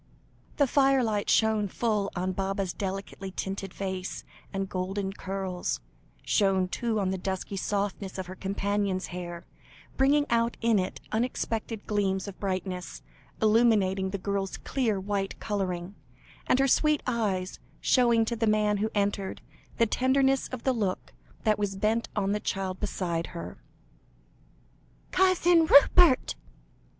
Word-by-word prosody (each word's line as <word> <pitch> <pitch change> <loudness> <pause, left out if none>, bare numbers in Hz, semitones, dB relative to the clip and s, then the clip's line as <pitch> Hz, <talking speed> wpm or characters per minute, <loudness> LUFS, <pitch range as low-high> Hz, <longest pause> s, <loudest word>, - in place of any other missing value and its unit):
The 285 - +5
firelight 260 -6 +2
shone 220 -2 +3
full 210 0 0
on 185 +1 -1
Baba's 195 0 -2
delicately 195 0 -5
tinted 195 +1 -4
face, 190 -1 -4 0.3
and 195 -1 -2
golden 190 +1 -3
curls; 190 -2 -3 0.4
shone, 190 -2 +2
too, 225 +3 -1
on 190 -2 0
the 190 - -2
dusky 190 +1 -3
softness 200 0 -2
of 190 - -3
her 180 - -8
companion's 200 0 -1
hair, 175 -1 -6 0.5
bringing 285 +2 +4
out 235 0 +2
in 230 -3 +3
it 185 - -3
unexpected 225 -1 -2
gleams 200 -2 0
of 195 - -8
brightness, 185 -2 -4 0.4
illuminating 210 -4 +3
the 200 - -3
girl's 195 0 -2
clear 230 -7 -1
white 195 0 -3
colouring, 190 -3 -3 0.5
and - - +4
her 270 +1 +3
sweet 305 +2 +3
eyes, 200 -6 -1 0.2
showing 235 -3 +4
to 235 - -2
the 225 0 0
man 210 -1 +2
who 215 +2 0
entered, 200 -1 -1 0.4
the 230 - +4
tenderness 265 +3 +2
of 255 -2 -7
the 260 - +2
look 205 -6 -2 0.3
that 215 -1 +2
was 200 -1 -1
bent 220 +3 0
on 200 -2 0
the 210 - +1
little - - -21
child 190 -1 -2
beside 175 -5 -2
her. - - -8 1.5
"Cousin 355 -3 +4
Rupert!" 285 0 +6
200 Hz, 140 wpm, -28 LUFS, 190-230 Hz, 1.5 s, Rupert